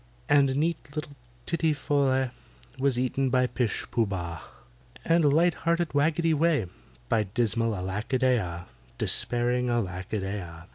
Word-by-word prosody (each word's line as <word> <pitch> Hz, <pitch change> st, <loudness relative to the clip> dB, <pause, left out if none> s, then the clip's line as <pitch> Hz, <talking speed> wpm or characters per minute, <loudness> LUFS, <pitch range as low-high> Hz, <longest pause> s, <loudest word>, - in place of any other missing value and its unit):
And 140 Hz, -2 st, +4 dB
neat 150 Hz, -2 st, -2 dB
little 150 Hz, -1 st, -4 dB, 0.3 s
TITTY 165 Hz, -2 st, +1 dB
FOL 140 Hz, 0 st, 0 dB
LEH 130 Hz, -1 st, +1 dB, 0.5 s
Was 135 Hz, -2 st, +2 dB
eaten 130 Hz, +1 st, 0 dB
by 125 Hz, 0 st, +3 dB
PISH 125 Hz, -3 st, -2 dB
POOH 115 Hz, -2 st, +1 dB
BAH, 85 Hz, -4 st, -4 dB, 0.6 s
And 165 Hz, -3 st, +4 dB
light 170 Hz, +4 st, +4 dB
hearted 170 Hz, 0 st, -1 dB
WAGGETY 160 Hz, +3 st, +2 dB
WEH 155 Hz, -, +2 dB, 0.4 s
By 115 Hz, -, +2 dB
dismal 115 Hz, +1 st, 0 dB
ALACK 95 Hz, +7 st, -4 dB
A -, -, +4 dB
DEY 130 Hz, -1 st, +3 dB
AH— 85 Hz, -3 st, -5 dB, 0.3 s
Despairing 125 Hz, +1 st, +2 dB
ALACK 95 Hz, -6 st, -2 dB
A 110 Hz, -, +1 dB
DEY 100 Hz, +2 st, -3 dB
AH. 85 Hz, -2 st, -10 dB
130 Hz, 155 wpm, -27 LUFS, 105-145 Hz, 0.6 s, And